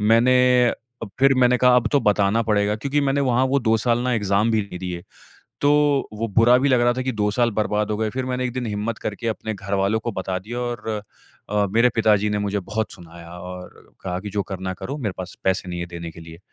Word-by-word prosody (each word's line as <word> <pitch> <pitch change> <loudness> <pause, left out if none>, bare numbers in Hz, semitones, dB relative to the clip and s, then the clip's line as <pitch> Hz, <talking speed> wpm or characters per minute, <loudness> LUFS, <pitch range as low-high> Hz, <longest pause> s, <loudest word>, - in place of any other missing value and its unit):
मैंने 115 +4 +4 0.3
अ, - - -4 0.5
फिर 135 0 +5
मैंने 125 -1 +4
कहा 125 -1 +5
अब 120 -2 +2
तो 145 - +4
बताना 105 0 +2
पड़ेगा। 105 -1 +1
क्योंकि 140 +6 -1
मैंने 140 0 +1
वहाँ 130 0 +2
वो 140 +1 +2
2 115 -1 +2
साल 120 +1 +1
ना 125 0 0
एग्ज़ाम 105 +1 +1
भी 110 -1 +2
नहीं 100 -3 -8
दिए। 90 -2 -5 0.6
तो 145 - +4 0.4
वो 110 +2 -2
बुरा 120 +2 +6
भी 140 +2 +2
लग 125 -2 +3
रहा 120 0 +4
था 130 - -2
कि 130 0 -2
2 105 -1 0
साल 120 +1 +2
बर्बाद 105 -1 0
हो - - -1
गए। 110 0 -1
फिर 130 +2 -3
मैंने 125 0 -2
एक 125 - -2
दिन 125 -1 -3
हिम्मत 105 +2 -3
करके 105 +3 -5
अपने 110 0 -3
घरवालों 100 +2 0
को 115 0 -4
बता 95 -1 -3
दिया 120 +6 -6
और 120 -2 -4 0.6
अ, 105 -1 +2
मेरे 115 +2 +5
पिताजी 105 -2 +3
ने 105 - 0
मुझे 100 0 -1
बहुत 105 +4 -3
सुनाया 85 -1 -12
और 90 0 -10
कहा 90 -1 -3
कि 105 0 -7
जो 100 0 -1
करना 95 -1 -5
है - - -4
करो 140 - -4
मेरे 105 -8 -2
पास 90 -1 -7
पैसे 95 -1 0
नहीं 90 -1 -4
है 85 - -3
देने 85 -1 -7
के 85 - -12
लिए। 80 0 -11
110 Hz, 245 wpm, -22 LUFS, 100-120 Hz, 0.6 s, बुरा